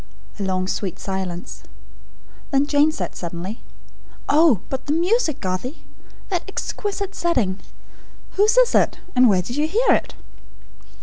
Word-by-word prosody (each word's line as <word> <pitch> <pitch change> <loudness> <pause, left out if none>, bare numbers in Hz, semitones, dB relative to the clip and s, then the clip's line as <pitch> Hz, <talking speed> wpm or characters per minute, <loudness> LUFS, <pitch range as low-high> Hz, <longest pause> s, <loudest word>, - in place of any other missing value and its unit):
'" - - -24
A - - -2
long 185 -1 -1
sweet 190 -2 -3
silence. 190 -3 -5 0.9
Then 275 -1 +3
Jane 295 +1 +4
said, - - -4
suddenly: 175 +6 -6 0.7
"Oh, 295 - +5
but 265 +1 -5
the 290 - +1
music, 345 - +1
Garthie! 185 - -4 0.5
That 360 -3 0
exquisite 400 0 -4
setting. 225 - 0 0.7
Whose 425 +4 +3
is - - +5
it? - - +3 0.2
And 250 -1 +6
where 185 -3 +3
did 240 +8 -5
you 300 +1 +2
hear 450 +9 +1
it?" - - +1
275 Hz, 140 wpm, -22 LUFS, -, 0.9 s, And